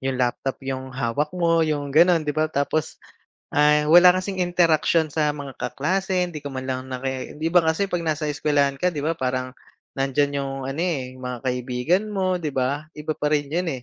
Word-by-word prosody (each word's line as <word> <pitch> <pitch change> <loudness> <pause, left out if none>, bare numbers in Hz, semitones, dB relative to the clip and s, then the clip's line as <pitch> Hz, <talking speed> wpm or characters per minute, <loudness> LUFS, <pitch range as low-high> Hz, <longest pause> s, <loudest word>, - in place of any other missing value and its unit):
'Yong 135 -1 -2
laptop 125 +1 -1
'yong 130 0 -4
hawak 130 +3 -1
mo, 165 -1 +3
'yong 145 -3 -1
gano'n, 165 +1 +5
'di 150 - -1
ba? 155 +1 0
Tapos, 150 +1 -1 0.6
ah, 150 0 +4
wala 175 +2 +8
kasing 190 0 -5
interaksyon 165 -2 +2
sa 150 0 0
mga 140 -3 -8
kaklase, 180 +7 -1
hindi 150 -4 -8
ka 140 - -5
man 130 0 -5
lang 130 0 -2
naki 130 +3 -5
'di 160 - +1
ba 175 0 +4
kasi 160 +5 +1
'pag 175 -2 -2
nasa 155 -1 -1
eskwelahan 145 -1 +1
ka, 180 +5 0
'di 150 - -4
ba 160 +3 -1
parang 130 -2 -2 0.5
nandiyan 140 +1 +1
'yong 135 -1 -3
ano, 140 +4 -3
eh, 130 -8 -3
'yong 130 - -11
mga 125 -1 -4
kaibigan 125 - 0
mo, 185 -2 0
'di 155 -5 -4
ba? 135 +3 -1
Iba 150 0 -4
pa 150 0 -1
rin 145 -2 +1
'yon, 170 +4 -1
eh. 130 - -7
150 Hz, 205 wpm, -23 LUFS, 135-165 Hz, 0.6 s, wala